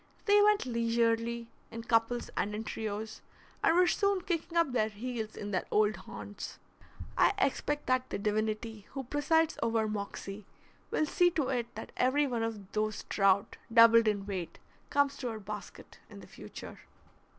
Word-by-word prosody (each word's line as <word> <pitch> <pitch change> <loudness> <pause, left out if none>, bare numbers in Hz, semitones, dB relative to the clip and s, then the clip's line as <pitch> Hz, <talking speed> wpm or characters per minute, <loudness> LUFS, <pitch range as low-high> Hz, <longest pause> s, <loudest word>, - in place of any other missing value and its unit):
They 410 -1 +6
went 420 -4 +4
leisurely, 230 -1 0 0.2
in 230 0 -7
couples 230 +1 +1
and 210 +1 -1
in 215 - -3
trios, 220 0 -5 0.4
and 330 - +4
were 360 +1 +6
soon 400 +1 +2
kicking 340 -1 -2
up 335 -5 +3
their 220 -3 +1
heels 220 0 -5
in 205 0 -5
their 185 - -1
old 215 0 +3
haunts. 205 - -8 0.6
I - - +4
expect 295 -4 0
that 255 0 +1
the - - -2
divinity 215 +1 -2
who 270 -1 -4
presides 305 +5 +1
over 225 -1 +1
Moxie 200 -1 -5 0.4
will 310 - +1
see 355 +4 +3
to 305 -6 -1
it 240 -3 -2
that - - -7
every 280 +4 +3
one 240 -4 -2
of 215 -4 -4
those 215 0 -1
trout, 195 +1 +2
doubled 230 0 +7
in 200 -2 0
weight, 190 -4 -5 0.3
comes 285 -1 +2
to 250 - -3
our 220 -1 -5
basket 210 0 -9
in - - -11
the - - -12
future. - - -10
230 Hz, 165 wpm, -31 LUFS, 215-275 Hz, 0.6 s, doubled